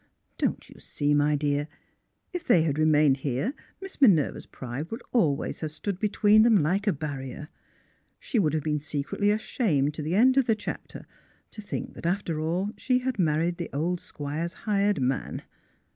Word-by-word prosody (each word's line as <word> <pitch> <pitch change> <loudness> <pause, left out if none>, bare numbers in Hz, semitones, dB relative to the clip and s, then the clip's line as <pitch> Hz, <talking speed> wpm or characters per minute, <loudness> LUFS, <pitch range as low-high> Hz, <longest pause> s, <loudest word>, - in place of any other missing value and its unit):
"Don't - - -1
you - - -15
see, 145 0 -1
my 145 0 +3
dear, 145 0 0 0.7
if 355 -1 -3
they 170 - +4
had 150 -2 -1
remained 150 -3 +4
here 140 - -2 0.3
Miss 385 -5 -9
Minerva's 185 - +4
pride 130 +6 -6
would 225 +3 -6
always 155 - +1
have 155 -2 -4
stood 190 +4 -4
between 210 0 +4
them 220 -7 +5
like 195 +7 0
a - - +5
barrier. 145 -1 -6 0.7
She 240 - -1
would 155 -6 +2
have 155 - -1
been 150 0 0
secretly 150 +7 -1
ashamed 190 - +1
to 155 - -5
the 155 +4 -1
end 255 +5 +5
of 270 - +4
the 225 - +3
chapter 215 - -7 0.5
to 215 - -8
think 205 - -5
that, - - -5
after 175 -3 -1
all, 175 +6 -1
she 255 -1 +1
had 255 -3 -2
married 165 +1 +1
the 170 - -5
old 170 +5 -1
Squire's 155 +4 -5
hired 205 -2 +2
man. 130 +1 -2
165 Hz, 175 wpm, -27 LUFS, 150-205 Hz, 0.7 s, them